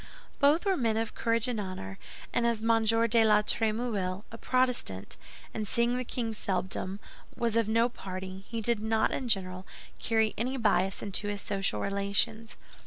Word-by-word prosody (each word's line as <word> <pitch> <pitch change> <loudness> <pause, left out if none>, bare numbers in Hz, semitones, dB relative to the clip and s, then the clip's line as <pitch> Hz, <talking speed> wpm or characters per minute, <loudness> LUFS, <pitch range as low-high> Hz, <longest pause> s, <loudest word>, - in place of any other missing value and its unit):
Both 295 +7 +4
were 390 -1 +3
men 225 -4 +1
of 225 0 -2
courage 230 0 +1
and 240 -3 -1
honor; 185 - -6 0.3
and 240 - +2
as 230 -2 0
M. 225 -1 +3
de 225 +1 +4
la 210 -1 +5
Trémouille—a 215 -3 -1
Protestant, 250 - 0 0.4
and 215 -1 -3
seeing 235 +3 +2
the 255 - -1
king 235 -2 -3
seldom—was 195 +3 -3
of 230 -2 +2
no 230 +2 +4
party, 190 -4 -7
he 230 -1 -3
did 235 0 +2
not, 220 0 +1
in 260 - -2
general, 185 -4 -1 0.3
carry 220 -1 +2
any 255 +4 -1
bias 195 -4 +1
into 205 0 -1
his 205 -1 -2
social 195 -1 0
relations. 200 +3 0
220 Hz, 160 wpm, -30 LUFS, 195-235 Hz, 0.4 s, la